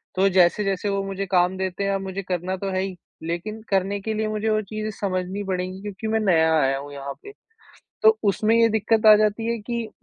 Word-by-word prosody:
तो 195 +1 +3
जैसे-जैसे 195 +2 +2
वो 195 0 -1
मुझे 195 0 -4
काम 180 +1 +2
देते 190 +1 -3
हैं, 200 - 0
अब 195 0 -1
मुझे 190 +1 -4
करना 185 0 -2
तो 195 +1 -4
है 185 0 0
ही, 190 -1 -4 0.3
लेकिन 175 +7 -4
करने 195 +1 0
के 220 +2 -3
लिए 215 0 -1
मुझे 215 +1 -1
वो 215 0 +2
चीज़ें 215 0 -3
समझनी 190 0 -2
पड़ेंगी 185 0 -3
क्योंकि 205 +1 -6
मैं 220 0 +1
नया 160 -6 +3
आया 135 -1 +2
हूँ 145 +1 -8
यहाँ 140 0 -6
पे। 410 - -9 0.7
तो 220 0 +6
उसमें 215 +2 +2
ये 230 0 +5
दिक्कत 220 0 +1
आ 215 - +10
जाती 215 +2 +1
है 230 - -3
कि 235 -2 -2
195 Hz, 220 wpm, -23 LUFS, 185-215 Hz, 0.7 s, आ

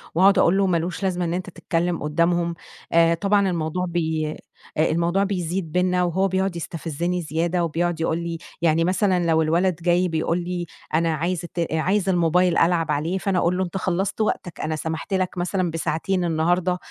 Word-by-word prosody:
وأقعد 195 +3 +5
أقول 180 +3 +4
له 195 -1 +3
مالوش 175 +2 -1
لازمة 180 -2 0
إن 170 - -1
أنت 185 +1 -3
تتكلم 170 -1 -2
قدّامهم. 170 +2 +1 0.4
آآ 165 0 +5
طبعًا 200 +3 +2
الموضوع 170 +1 -1
بي 160 -3 -1 0.4
آآ 155 - +3
الموضوع 170 +4 +1
بيزيد 180 -3 -2
بينا، 180 0 +2
وهو 190 +3 +1
بيقعد 190 -1 -1
يستفزني 170 +2 -3
زيادة، 170 +3 -1
وبيقعد 170 +1 -1
يقول 165 0 0
لي 170 -1 -4 0.2
يعني 165 0 +3
مثلًا 185 0 +1
لو 160 -1 +3
الولد 170 +3 +2
جاي 175 +1 +2
بيقول 165 +1 0
لي 175 0 -3 0.3
أنا 165 0 +2
عايز 170 +3 -1
الت 170 -1 -3
عايز 190 +5 +1
الموبيل 175 0 +3
ألعب 165 -1 +2
عليه، 165 +6 -1
فأنا 190 -1 0
أقول 175 +2 +1
له 190 - +1
أنت 185 +1 -4
خلصت 190 +3 -1
وقتك، 180 -5 -2
أنا 155 0 -1
سمحت 160 +5 -4
لك 185 -1 -1
مثلًا 180 -1 -1
بساعتين 165 +3 -1
النهارده، 175 +2 +1
175 Hz, 175 wpm, -23 LUFS, 165-185 Hz, 0.4 s, وأقعد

